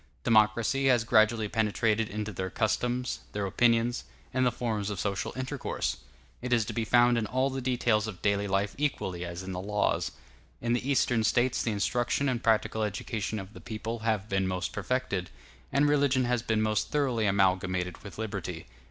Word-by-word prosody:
Democracy 115 +5 +3
has 125 -3 +4
gradually 110 -1 +3
penetrated 110 +1 +1
into 105 0 -4
their 95 +1 -3
customs, 120 +4 -1
their 105 -1 -1
opinions, 115 +4 +2 0.3
and 130 0 +3
the - - +2
forms 110 -4 -2
of 100 -3 -4
social 100 -2 -2
intercourse; 130 +1 -3 0.4
it 125 0 -4
is 115 -3 +3
to 110 - -5
be 115 - -1
found 120 +2 +4
in 110 - -2
all 130 +3 +1
the 135 0 -3
details 120 -4 +1
of 95 -5 -7
daily 100 0 +1
life 100 +1 0
equally 95 -12 -1
as 85 +1 -6
in 95 - -6
the 90 0 -4
laws. 105 +1 0 0.5
In 120 0 0
the 125 +3 -1
Eastern 120 -4 +2
States 120 +3 +2
the - - -1
instruction 120 +6 0
and 125 -3 0
practical 110 0 +2
education 105 +1 -2
of 95 0 -7
the - - -11
people 115 0 -5
have 110 -2 -1
been 95 -2 0
most 90 0 -2
perfected, 100 -8 -2 0.4
and 140 +2 +3
religion 140 -3 +3
has 120 -1 +1
been 110 -2 0
most 110 -1 0
thoroughly 125 -7 +1
amalgamated 95 -2 +1
with 100 - -10
liberty. 95 -6 -4
110 Hz, 180 wpm, -29 LUFS, 100-120 Hz, 0.5 s, has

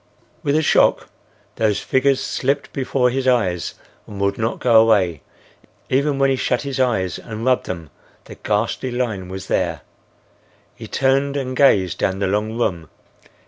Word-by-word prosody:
With 140 0 0
a 155 - +2
shock - - +3 0.5
those 105 -2 +1
figures 135 0 +1
slipped 140 +2 -2
before 130 -2 +1
his 130 +1 -2
eyes 95 -9 +1 0.3
and 100 - -9
would 100 0 +1
not 110 +2 -2
go 115 -3 +5
away. 95 -9 +2 0.7
Even 140 +2 +1
when 135 0 +3
he - - +2
shut 125 0 -1
his 140 -2 -4
eyes 110 -9 0
and 110 0 -7
rubbed 130 -1 +2
them 80 -6 -6 0.3
the - - -10
ghastly 115 +4 -2
line 115 -7 -3
was 95 0 -6
there. - - -1 0.9
He - - -10
turned 135 +1 +1
and 130 -2 -3
gazed 100 - +3
down 95 - 0
the 100 - -1
long 105 +3 -1
room. 85 - -2
120 Hz, 160 wpm, -20 LUFS, 100-135 Hz, 0.9 s, go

